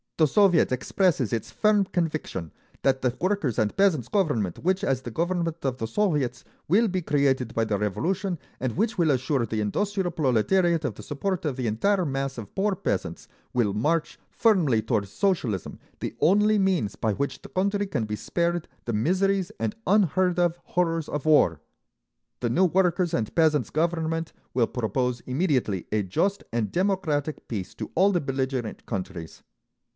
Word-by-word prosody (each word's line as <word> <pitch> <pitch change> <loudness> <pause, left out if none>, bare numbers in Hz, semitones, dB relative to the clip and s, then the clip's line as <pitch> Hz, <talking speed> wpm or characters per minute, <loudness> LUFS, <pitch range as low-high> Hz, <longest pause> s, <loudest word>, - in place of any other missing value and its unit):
The 160 - +5
Soviet 180 -1 +4
expresses 130 - +1
its 115 - -2
firm 210 -1 +3
conviction 155 - -3 0.3
that 135 -1 +2
the 125 -1 0
Workers' 185 - 0
and 105 -1 +1
Peasants' 170 - +2
Government 145 - 0
which, 185 +2 0
as 130 -2 +1
the 125 - -6
government 170 +3 -1
of 130 -2 -1
the 115 - -3
Soviets, 145 - 0 0.2
will 215 +8 +4
be 185 -2 -1
created 135 -5 +1
by 115 - +2
the 105 -2 0
Revolution, 170 - -1 0.2
and 130 0 -2
which 225 +4 0
will 170 -3 +3
assure 130 -1 +1
the 110 -1 -2
industrial 190 - -1
proletariat 165 - +2
of 120 - -1
the 105 - -10
support 185 - -2
of 145 -4 -1
the 130 -1 -3
entire 180 - +1
mass 135 -2 -2
of 105 -3 -9
poor 200 0 +1
peasants, 90 - -3 0.3
will 115 -5 +1
march 150 +10 0
firmly 170 - +3
toward 110 -2 -1
Socialism, 125 - -1 0.2
the - - -4
only 210 +4 +4
means 185 - +1
by 110 -2 0
which 140 +5 -3
the - - -11
country 200 +2 0
can 115 - -1
be 105 0 -3
spared 170 +7 -1 0.2
the 120 - -2
miseries 185 - +1
and 215 - -2
unheard 185 -2 +3
of 175 -1 +1
horrors 165 -3 -1
of 150 0 -3
war. 90 - +4 0.8
The 120 - 0
new 180 +11 +3
Workers' 180 -1 +2
and 110 -3 -1
Peasants' 155 -3 +2
Government 165 0 -1 0.2
will 120 -2 +2
propose 125 +1 -1
immediately 130 - 0
a 110 - +2
just 195 - 0
and 115 -3 -1
democratic 170 -6 -1
peace 95 -5 -5
to - - -6
all 195 +4 +4
the 175 -3 +1
belligerent 130 -4 -3
countries. 90 -4 -6
155 Hz, 170 wpm, -26 LUFS, 120-185 Hz, 0.8 s, The